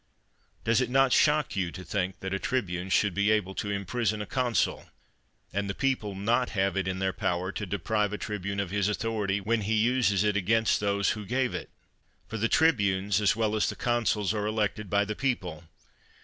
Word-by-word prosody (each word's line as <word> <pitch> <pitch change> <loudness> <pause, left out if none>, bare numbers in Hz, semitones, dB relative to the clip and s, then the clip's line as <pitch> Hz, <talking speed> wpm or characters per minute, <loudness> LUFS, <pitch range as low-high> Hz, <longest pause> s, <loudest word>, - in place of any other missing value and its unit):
Does 115 +2 +3
it 125 - -1
not 135 0 +4
shock 150 -2 +3
you 90 -3 -1
to 95 - -8
think 95 +1 -3
that 95 0 -3
a 95 - -1
tribune 95 -8 -2
should 100 +1 +2
be 100 +3 +2
able 105 -3 +1
to 100 - -3
imprison 105 +2 -1
a 105 - -3
constQ, 125 +1 0 0.7
and 100 +1 -1
the 100 - -3
people 125 -7 -1
not 115 +6 +1
have 95 +1 +1
it 95 -1 -1
in 95 0 -2
their 95 0 -1
power 90 +2 -1
to 105 0 -5
deprive 105 +2 0
a 105 - -3
tribune 100 -2 -4
of 100 -3 -2
his 100 0 +1
authority, 105 -2 -1
when 110 +3 0
he 105 +2 0
uses 110 -3 +2
it 105 -1 +1
against 110 +3 +2
those 100 -1 +1
who 105 -1 -4
gave 125 +5 0
it? - - -5 0.6
For 115 - -5
the 115 +2 +1
tribunes, 100 - +2
as 105 0 +3
well 110 -1 0
as 110 - +1
the - - -4
consuls, 115 -4 0
are 105 -1 -1
elected 105 -1 -1
by 100 +2 +2
the 105 +1 -4
people. 90 - -2
105 Hz, 205 wpm, -28 LUFS, 95-115 Hz, 0.7 s, not